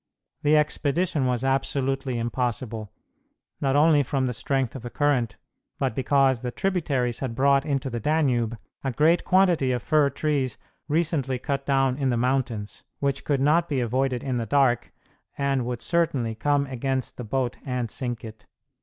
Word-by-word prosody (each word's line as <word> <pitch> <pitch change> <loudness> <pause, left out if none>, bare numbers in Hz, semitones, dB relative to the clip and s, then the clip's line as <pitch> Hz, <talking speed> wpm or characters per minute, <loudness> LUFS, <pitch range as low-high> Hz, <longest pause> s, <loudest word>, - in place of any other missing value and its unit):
The 150 +1 +4
expedition 150 0 +1
was 125 0 0
absolutely 135 -1 0
impossible, 115 -2 -3 0.7
not 135 -1 +1
only 150 0 +5
from 135 0 -1
the 125 - -1
strength 135 +2 -1
of 135 - -6
the 120 - -6
current, 125 -4 0 0.4
but - - 0
because 135 -1 +2
the 125 - -3
tributaries 140 - -1
had 125 -4 -3
brought 140 +2 +3
into 140 -2 -1
the 120 -2 -3
Danube 120 -5 +1 0.3
a 135 - -1
great 160 +7 +3
quantity 180 -8 +3
of 125 -1 -2
fir 150 -2 +3
trees 140 -2 -1 0.3
recently 150 -4 0
cut 140 +1 -3
down 135 -2 +2
in 135 -2 0
the 120 - +1
mountains, 120 -4 -1 0.2
which 140 -1 -1
could 140 -3 0
not 165 +5 +3
be 140 -3 0
avoided 125 +1 0
in 130 -3 -1
the 115 -1 -2
dark, 130 -1 +2 0.5
and 135 -3 0
would 120 -2 -4
certainly 145 -10 0
come 145 +5 +1
against 130 0 -3
the 125 - -5
boat 125 +2 -2
and 125 -4 -3
sink 120 -3 -4
it. 110 -1 -11
135 Hz, 165 wpm, -25 LUFS, 120-145 Hz, 0.7 s, only